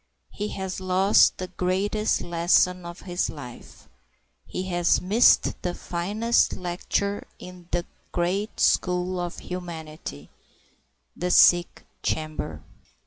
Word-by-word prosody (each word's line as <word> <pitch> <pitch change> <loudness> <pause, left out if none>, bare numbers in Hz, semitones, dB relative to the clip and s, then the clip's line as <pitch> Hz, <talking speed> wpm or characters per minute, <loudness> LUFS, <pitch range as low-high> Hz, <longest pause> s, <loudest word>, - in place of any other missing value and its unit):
He 210 - -4
has 190 -2 -5
lost 185 +2 +4
the 185 - -4
greatest 195 +4 0
lesson 175 +1 +2
of 170 0 -9
his 175 -1 -2
life; 125 -5 -11 0.6
he 185 - -4
has 175 -2 +2
missed 210 +7 +4
the 175 -1 -3
finest 210 +7 0
lecture 185 +3 -2
in 180 -1 -12
that 175 0 -1 0.3
great 190 +5 -1
school 180 0 +1
of 175 -1 -4
humanity, 160 - -7 0.8
the 180 - -2
sick 175 0 +5 0.2
chamber. 155 - -3
180 Hz, 110 wpm, -25 LUFS, 175-190 Hz, 0.8 s, sick